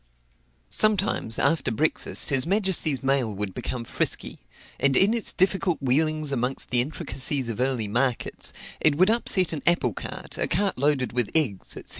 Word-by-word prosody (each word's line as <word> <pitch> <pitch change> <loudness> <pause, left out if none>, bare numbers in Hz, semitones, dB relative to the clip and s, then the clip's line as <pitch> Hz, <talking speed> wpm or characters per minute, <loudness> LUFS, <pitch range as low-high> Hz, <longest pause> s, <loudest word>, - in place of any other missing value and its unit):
Sometimes 205 - +1
after 160 -5 +1
breakfast 155 +5 +1
his 135 +2 +2
majesty's 190 -8 0
mail 135 -4 +1
would 100 -1 -4
become 125 +4 -4
frisky: - - -3 0.4
and 140 -1 +3
in 200 +4 +4
its 230 -2 0
difficult 190 -2 +1
wheelings 155 +3 +1
amongst 130 0 -2
the 120 -1 +4
intricacies 135 -2 -1
of 115 - -5
early 125 -4 0
markets, 120 +3 -2 0.3
it 155 -2 +4
would 185 +7 +4
upset 190 -7 +1
an 155 - -4
apple 150 -10 +2
cart, - - -8
a - - +3
cart 195 +3 0
loaded 140 -4 0
with 120 -3 +1
eggs, 120 - 0
&c. - - -9
140 Hz, 160 wpm, -25 LUFS, 125-175 Hz, 0.4 s, in